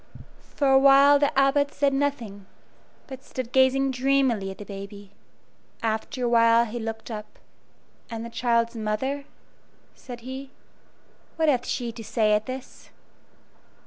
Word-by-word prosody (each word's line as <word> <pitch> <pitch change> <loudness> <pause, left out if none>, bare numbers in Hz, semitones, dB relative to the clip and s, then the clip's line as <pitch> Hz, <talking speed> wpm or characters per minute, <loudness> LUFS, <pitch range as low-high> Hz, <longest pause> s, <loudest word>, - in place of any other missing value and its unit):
For 285 - +1
a 265 - +6
while 280 +1 +6
the 285 -2 0
Abbot 285 +1 +3
said 280 -2 +1
nothing, 235 -9 -3 0.6
but 265 -1 -10
stood 255 -2 -6
gazing 265 +1 +3
dreamily 255 -6 +1
at 190 - -8
the 205 - -9
baby. 200 0 -10 0.7
After 225 +3 -2
a - - +1
while 230 0 +4
he 235 +1 -6
looked 225 +1 -6
up. 210 -1 -8 0.7
"And 230 0 -6
the 235 - -9
child's 235 -1 0
mother," 235 +6 -3 0.7
said 245 -2 -10
he 260 +2 -8 0.9
"what 320 -1 +2
hath 255 -3 0
she 240 -2 -3
to 225 0 -10
say 215 -1 +1
at 210 +1 0
this?" 260 0 -9
245 Hz, 145 wpm, -25 LUFS, 220-270 Hz, 0.9 s, a